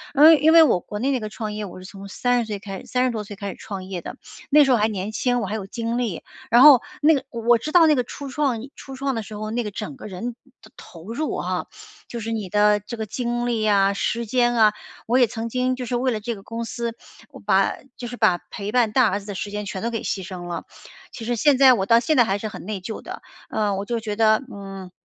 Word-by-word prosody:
呃， 310 +3 +9
因 315 +2 +4
为 330 - +9
我 290 - +3
国 210 +4 -7
内 270 +4 0
那 260 - 0
个 215 - -5
创 215 0 -5
业， 210 0 -4
我 185 - -10
是 - - -11
从 195 +1 -10
30 245 +3 0
岁 205 -2 -4
开 195 -2 -7
始， - - -13
30 255 0 +1
多 215 -2 -4
岁 205 - -9
开 200 0 -5
始 - - -8
创 195 -3 -6
业 185 -2 -6
的， 245 - -8 0.3
那 300 +1 +7
时 270 - +2
候 245 - +5
还 215 +1 +2
年 205 0 -4
轻。 245 +2 0
我 210 - -3
还 210 - -3
有 200 -3 -4
精 230 +2 -3
力， 230 -9 -2 0.3
然 240 +1 +6
后 280 -4 +9 0.2
那 310 +2 +6
个 275 -2 -1
我 235 -1 +2
知 300 +7 -6
道 335 -2 +7
那 305 - +5
个 250 -2 0
初 280 +2 -8
创 270 -3 0 0.2
初 270 -1 -9
创 270 -1 -2
的 225 - -2
时 210 +1 -9
候， 215 +1 -5
那 240 +1 -1
个 210 - -4
整 215 +7 -6
个 - - -11
人 210 +5 -5 0.3
的 220 - -17
投 175 +6 -11
入 305 +6 -2
啊， - - -2 0.4
就 235 -1 -6
是 225 +2 -4
你 215 -4 -3
的 210 +2 +3
这 210 +3 -8
个 220 -1 -4
精 240 +2 -2
力 230 -2 0
呀， 200 -2 +3
时 235 +3 -2
间 240 +1 +2
啊， 215 -2 +5 0.4
我 245 +3 +3
也 245 - +5
曾 230 +1 -5
经 255 +1 0
就 255 -1 -5
是 245 +1 -1
为 255 +1 0
了 215 -2 -3
这 235 +2 -3
个 195 - -12
公 230 0 -5
司， 235 0 -4 0.4
我 - - -12
把 - - +2 0.2
就 245 - -6
是 245 - -6
把 210 -7 +3
陪 205 +1 -5
伴 240 -3 +2
大 255 -3 +5
儿 200 - -1
子 200 - -14
的 205 - -5
时 205 +2 -4
间 210 0 -5
全 190 -1 -5
都 235 - -1
给 225 -2 -4
牺 190 - -2
牲 180 -1 -7
了。 175 - -5 0.5
其 225 - -8
实 240 +1 0
现 280 +4 +3
在 260 -1 +7
我 190 -5 0
到 230 0 +6
现 310 +5 +1
在 240 - +7
还 200 -2 0
是 215 - -5
很 215 - -9
内 210 -2 -4
疚 210 +4 -7
的， - - -8 0.3
呃， 210 -2 0
我 195 +1 -4
就 235 +2 -2
觉 215 -2 -4
得， 220 +3 +3
嗯， 195 -2 -9
225 Hz, 290 characters per minute, -23 LUFS, 205-245 Hz, 0.5 s, 呃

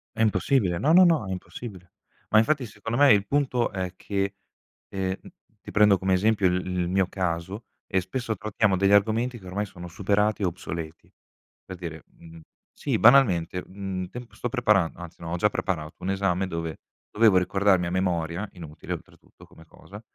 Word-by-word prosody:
È - - -2
impossibile. 100 -2 +2
No, 145 - +2
no, 180 +2 +8
no, 165 - +3
è - - -4
impossibile. 95 -1 -8 0.4
Ma 110 - +4
infatti, 130 +4 +3
secondo 115 +2 -5
me, 145 -1 +7
il 100 -1 +2
punto 130 -3 0
è 95 -2 -4
che 100 0 -2 0.5
ehm, 95 -1 -2 0.5
ti - - -10
prendo 105 -2 +5
come 95 +1 0
esempio 100 +1 +3
il 90 0 0
il 90 -1 -1
mio 95 0 +2
caso, 95 +4 -3 0.2
e 95 - +1
spesso 110 +4 -3
trattiamo 105 0 0
degli 100 +1 +3
argomenti, 115 +4 +2
che 95 - -16
ormai 100 +3 -2
sono 90 -3 -10
superati 105 +3 0
o 95 - +3
obsoleti. 85 -2 -7 0.5
Per 95 - -8
dire, 80 -3 -7
mhmm, 80 0 -15 0.3
sì, - - -2
banalmente, 95 -9 +4
mhmm, 95 -1 -5
temp 120 -1 -10
sto 125 - -4
preparan 105 -8 +2
anzi 85 -1 -11
no, 85 - -6
ho 85 - -1
già 105 +4 +3
preparato 80 -8 -3
1 95 - -4
esame, 95 -1 0
dove 85 -2 -4 0.3
dovevo 105 -3 +4
ricordarmi, 95 0 +2
a - - -4
memoria- 90 +1 -1
inutile 80 -4 -8
oltretutto - - -12
come 80 - -18
cosa- 100 +5 -13
95 Hz, 180 wpm, -25 LUFS, 90-110 Hz, 0.5 s, no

